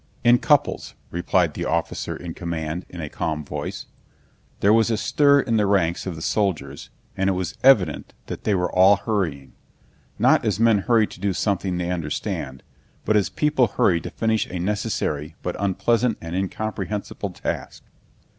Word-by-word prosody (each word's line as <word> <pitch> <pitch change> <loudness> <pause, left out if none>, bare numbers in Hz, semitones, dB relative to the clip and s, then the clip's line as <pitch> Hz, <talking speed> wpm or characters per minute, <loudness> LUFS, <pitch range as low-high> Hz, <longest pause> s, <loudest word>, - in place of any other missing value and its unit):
"In 120 0 +6
couples," - - +1 0.2
replied 85 +1 +1
the - - -4
officer - - -2
in 85 -2 -7
command 85 0 -4
in 90 - -8
a 75 - -4
calm 75 0 -3
voice. - - -5 0.7
There 100 +2 +4
was 115 0 +4
a 110 - +1
stir 140 +4 +4
in 115 -3 0
the 105 -2 +2
ranks 95 -3 +1
of 90 - -3
the 80 - -7
soldiers 75 -10 -2 0.3
and 95 0 +1
it - - +2
was 90 -2 -3
evident 95 - +3
that - - -7
they 105 - +2
were 90 -1 0
all 95 +2 +6
hurrying—not 90 - -2
as - - 0
men 115 -2 +4
hurry 115 +1 +3
to - - -13
do 100 0 0
something 95 -2 -1
they 90 0 -2
understand, 75 -5 -4 0.4
but 110 - +2
as 105 -2 +2
people 150 -5 +2
hurry 90 -4 +2
to - - -6
finish 110 -1 0
a 90 - -5
necessary 85 -6 -2
but 90 - -3
unpleasant 110 +4 +1
and 85 +1 -6
incomprehensible 105 +1 -3
task. 90 - -5
95 Hz, 165 wpm, -23 LUFS, 85-110 Hz, 0.7 s, In